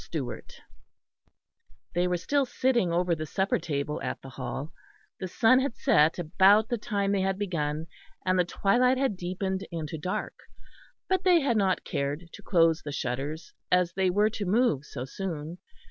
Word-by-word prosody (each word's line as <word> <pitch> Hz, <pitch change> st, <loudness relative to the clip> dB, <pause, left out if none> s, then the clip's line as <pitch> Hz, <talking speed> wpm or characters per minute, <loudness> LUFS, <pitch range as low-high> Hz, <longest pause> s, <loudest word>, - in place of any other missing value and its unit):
STEWART -, -, -6 dB, 1.3 s
They 175 Hz, +1 st, +1 dB
were 180 Hz, 0 st, 0 dB
still 280 Hz, +9 st, 0 dB
sitting 245 Hz, -9 st, +1 dB
over 175 Hz, +1 st, +1 dB
the 155 Hz, -1 st, -3 dB
supper 190 Hz, +6 st, 0 dB
table 150 Hz, -2 st, -3 dB
at 130 Hz, -2 st, -3 dB
the 135 Hz, -, -9 dB
Hall. 140 Hz, +4 st, -5 dB, 0.5 s
The 185 Hz, -, -3 dB
sun 230 Hz, +7 st, +4 dB
had 265 Hz, -3 st, -1 dB
set 150 Hz, +2 st, +3 dB
about 190 Hz, +6 st, +4 dB
the 240 Hz, -, -1 dB
time 200 Hz, -2 st, -1 dB
they 200 Hz, -1 st, +1 dB
had 190 Hz, 0 st, 0 dB
begun, 160 Hz, -6 st, -2 dB, 0.4 s
and 185 Hz, 0 st, +2 dB
the -, -, +5 dB
twilight 245 Hz, +8 st, +2 dB
had 265 Hz, -6 st, 0 dB
deepened 190 Hz, +2 st, -3 dB
into 160 Hz, -2 st, -5 dB
dark; 180 Hz, +4 st, -3 dB, 0.7 s
but 375 Hz, -1 st, +1 dB
they 355 Hz, -3 st, +5 dB
had 265 Hz, -4 st, +1 dB
not 195 Hz, -3 st, +1 dB
cared 145 Hz, +5 st, -3 dB
to -, -, -10 dB
close 165 Hz, -3 st, +3 dB
the 145 Hz, -, -6 dB
shutters 140 Hz, +4 st, -4 dB, 0.2 s
as 180 Hz, -1 st, +3 dB
they 190 Hz, 0 st, +1 dB
were 205 Hz, +4 st, +2 dB
to 205 Hz, -1 st, -4 dB
move 190 Hz, -, +2 dB
so 125 Hz, -3 st, -6 dB
soon. 165 Hz, +1 st, -5 dB
180 Hz, 170 wpm, -28 LUFS, 160-205 Hz, 1.3 s, the